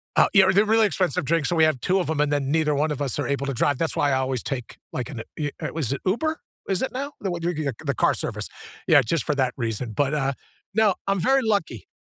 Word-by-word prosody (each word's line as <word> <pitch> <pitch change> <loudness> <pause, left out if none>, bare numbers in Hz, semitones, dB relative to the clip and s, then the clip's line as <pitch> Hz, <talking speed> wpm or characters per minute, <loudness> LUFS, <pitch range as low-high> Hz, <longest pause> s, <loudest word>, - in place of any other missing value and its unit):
Uh, - - +6
yeah, 190 -2 +6
they're 200 +3 +4
really 220 0 +4
expensive 180 -9 0
drinks, 165 +2 +1
so 175 - 0
we 160 - +4
have 155 -5 +3
2 185 +8 +1
of 175 - -2
'em 155 -2 -1
and 150 0 +2
then 140 -2 0
neither 155 -2 +2
one 150 +2 +1
of 145 - -4
us 135 -5 -2
are - - -1
able 140 0 -1
to 140 - -2
drive. 140 +3 +1
That's 165 +1 -1
why 145 - +2
I 135 - +3
always 130 -2 -1
take 125 -4 -5
like 130 +3 -4
an 120 -6 -6 0.2
eh, 145 -1 0
er - - -4
was 150 -7 -1
it - - -5
Uber? 315 +12 0 0.3
Is 190 - 0
it 260 - -1
now? 280 +3 -4
The 195 - -3
w 165 -4 -2
the 140 - +1
car - - +3
service? - - -3 0.4
Yeah, - - +7
just 160 +9 0
for 150 - -1
that 130 -2 +1
reason. 115 -1 -3
But, 140 +5 0
uh, 140 -2 0 0.4
no, 215 -3 +3
I'm 195 -1 +1
very 265 +8 +3
lucky. 200 - -1
150 Hz, 265 wpm, -24 LUFS, 135-190 Hz, 0.4 s, Yeah